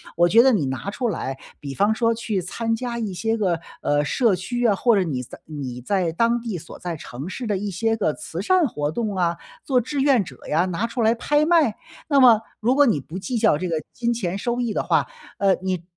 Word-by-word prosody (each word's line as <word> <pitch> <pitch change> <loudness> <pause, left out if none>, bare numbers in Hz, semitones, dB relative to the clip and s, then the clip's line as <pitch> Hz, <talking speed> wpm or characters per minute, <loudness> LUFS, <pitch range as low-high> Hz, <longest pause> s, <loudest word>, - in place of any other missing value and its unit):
我 175 +1 +4
觉 230 +6 +7
得 265 - +5
你 175 -10 +1
拿 135 +9 -4
出 245 +3 -2
来， 135 -9 -3 0.2
比 140 -2 -6
方 205 +5 +2
说 230 0 +2
去 220 -3 -2
参 225 +6 -2
加 235 0 -4
一 210 -4 -3
些 225 +5 0
个， 180 -6 0 0.2
呃， 145 0 +1
社 220 - +2
区 240 +7 -3
啊， 205 - +3
或 235 +2 +3
者 195 - +3
你 135 -7 -3
在 - - -12
你 130 -5 -6
在 180 +3 0
当 230 +7 +2
地 230 -6 -4
所 165 - -11
在 175 -2 -4
城 140 0 -8
市 235 +4 -5
的 205 -2 0
一 205 +1 -3
些 225 +4 0
个 175 -7 +1
慈 165 +4 -6
善 365 - +3
活 150 - -2
动 215 +2 -2
啊， 170 -2 0 0.3
做 255 -3 +2
志 275 +4 -2
愿 265 -7 +4
者 - - -11
呀， 165 +4 +2
拿 185 +5 -2
出 235 +1 -3
来 225 +1 +3
拍 295 +5 +2
卖。 320 -11 +4 0.3
那 280 -3 +4
么 235 -4 +7 0.2
如 240 +3 +2
果 290 0 +6
你 190 - +2
不 160 +6 -8
计 200 +6 -3
较 215 -9 +4
这 180 - -3
个 160 -2 -1
金 235 0 0
钱 195 -5 -2
收 240 +3 -2
益 235 -2 -1
的 - - -1
话， - - +2 0.3
呃， 195 -1 +4
你 185 -3 -2
210 Hz, 260 characters per minute, -23 LUFS, 170-235 Hz, 0.3 s, 觉